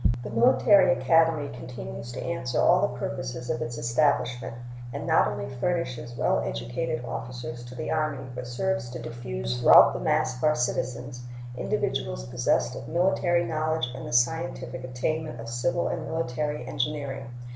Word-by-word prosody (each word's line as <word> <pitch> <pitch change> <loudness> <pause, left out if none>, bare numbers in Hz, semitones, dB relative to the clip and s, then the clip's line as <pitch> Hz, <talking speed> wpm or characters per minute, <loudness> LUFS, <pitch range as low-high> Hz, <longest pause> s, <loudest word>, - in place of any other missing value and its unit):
The - - -6
Military 130 - +5
Academy 155 +3 +3
continues 120 -1 -7
to - - -5
answer 130 -8 -2
all 180 +1 +5
the 205 - 0
purposes 130 -3 -4
of 120 - -2
its 120 0 -4
establishment, 120 -2 +1 0.4
and - - -5
not - - +4
only 105 -1 -3
furnishes 125 -4 -2
well - - +2
educated 60 - -3
officers 120 0 -6
to 125 +1 -10
the - - -4
Army, 155 -4 -1
but 125 0 -6
serves 125 0 -1
to 125 0 -6
diffuse 65 - -4
throughout - - +8
the 60 - -3
mass 130 - +1
of 125 - -9
our 155 0 +4
citizens 125 0 -2 0.3
individuals - - -2
possessed - - +1
of 115 - -7
military 175 +1 +2
knowledge 155 -3 -1
and 130 0 -7
the - - -6
scientific 130 0 0
attainments 130 +2 -2
of 115 0 -6
civil 145 +9 0
and - - -3
military 150 -3 -2
engineering. 135 0 -3
125 Hz, 155 wpm, -27 LUFS, 120-155 Hz, 0.4 s, throughout